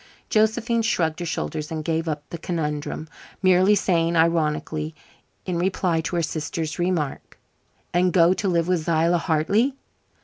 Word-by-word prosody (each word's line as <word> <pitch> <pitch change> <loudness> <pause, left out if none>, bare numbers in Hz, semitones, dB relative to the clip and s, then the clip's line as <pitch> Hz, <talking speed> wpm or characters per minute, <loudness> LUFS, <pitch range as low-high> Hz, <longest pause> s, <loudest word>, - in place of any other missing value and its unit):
Josephine 225 +2 +2
shrugged 165 -7 0
her 175 - -3
shoulders 150 - -3
and 155 -1 -4
gave 165 0 -1
up 150 -2 -3
the 170 - -5
conundrum, 155 -2 -3 0.4
merely 185 +2 +5
saying 170 -4 +1
ironically, 155 -1 0 0.5
in 180 -2 -2
reply 180 -2 +1
to 170 - -4
her 170 - +1
sister's 160 +1 -3
remark: 175 -5 -2 0.6
"And 180 +1 +3
go 175 0 +5
to 195 - -2
live 170 -2 +1
with 175 -4 0
Zillah 170 +1 +2
Hartley?" 200 - +1
170 Hz, 145 wpm, -23 LUFS, 160-185 Hz, 0.6 s, merely